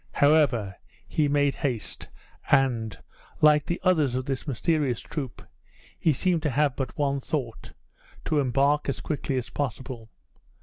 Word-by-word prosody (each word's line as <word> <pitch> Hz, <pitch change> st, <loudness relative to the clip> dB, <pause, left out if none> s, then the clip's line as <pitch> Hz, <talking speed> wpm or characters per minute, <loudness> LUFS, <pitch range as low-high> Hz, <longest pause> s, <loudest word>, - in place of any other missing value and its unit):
However, 140 Hz, -10 st, +3 dB, 0.3 s
he 150 Hz, -2 st, +1 dB
made 145 Hz, -1 st, +2 dB
haste, 125 Hz, -7 st, -3 dB, 0.4 s
and, 125 Hz, -6 st, +2 dB, 0.4 s
like 150 Hz, -1 st, +5 dB
the 175 Hz, -, -1 dB
others 155 Hz, -9 st, +3 dB
of 130 Hz, 0 st, -2 dB
this 135 Hz, +1 st, -3 dB
mysterious 140 Hz, -1 st, 0 dB
troop, 135 Hz, -8 st, -6 dB, 0.6 s
he 160 Hz, -, +3 dB
seemed 170 Hz, +4 st, +1 dB
to 150 Hz, -, 0 dB
have 145 Hz, 0 st, +1 dB
but 130 Hz, -3 st, -4 dB
one 140 Hz, -1 st, +1 dB
thought 130 Hz, -6 st, -4 dB, 0.5 s
to 155 Hz, -, +1 dB
embark 140 Hz, +3 st, +2 dB
as 140 Hz, -, -2 dB
quickly 145 Hz, -3 st, -2 dB
as 125 Hz, -, -4 dB
possible. 130 Hz, -3 st, -4 dB
140 Hz, 140 wpm, -26 LUFS, 125-150 Hz, 0.6 s, like